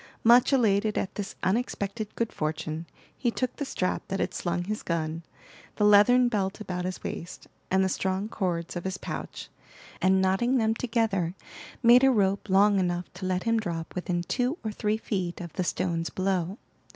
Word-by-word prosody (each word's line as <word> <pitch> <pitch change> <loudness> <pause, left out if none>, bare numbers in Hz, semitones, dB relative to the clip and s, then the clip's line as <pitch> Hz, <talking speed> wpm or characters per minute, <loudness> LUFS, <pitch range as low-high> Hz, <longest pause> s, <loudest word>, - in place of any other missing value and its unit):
Much 240 +3 +6
elated 215 -5 +2
at 190 - -2
this 205 -2 -5
unexpected 210 0 -2
good 230 -1 -2
fortune, 155 +1 -3 0.3
he 245 - 0
took 255 +2 -2
the 285 - -2
strap 185 -8 -1
that 195 - -3
had - - -1
slung 175 0 -2
his 210 +3 -3
gun, 165 -1 -2 0.5
the - - 0
leathern 210 +5 +6
belt 200 -4 -1
about 180 -4 -4
his 185 0 -5
waist, 170 - -6 0.2
and 190 0 +3
the - - +2
strong 190 +2 -1
cords 180 -6 -2
of 175 - -4
his 190 0 -3
pouch, - - -6 0.5
and 190 +1 +4
knotting 195 +8 +2
them 220 -2 +2
together, 220 -7 0 0.5
made 240 +2 +7
a 270 - +7
rope 200 -4 +1
long 200 +1 +5
enough 175 -1 -2
to 185 +1 -5
let 185 0 0
him 230 0 +2
drop 170 -6 -4
within 180 -1 -2
two 250 - -1
or 220 - -2
three 210 +1 -1
feet 185 -6 -3
of 170 -3 -7
the 185 - -1
stones 170 -2 -1
below. 185 0 -1
195 Hz, 180 wpm, -27 LUFS, 180-220 Hz, 0.5 s, made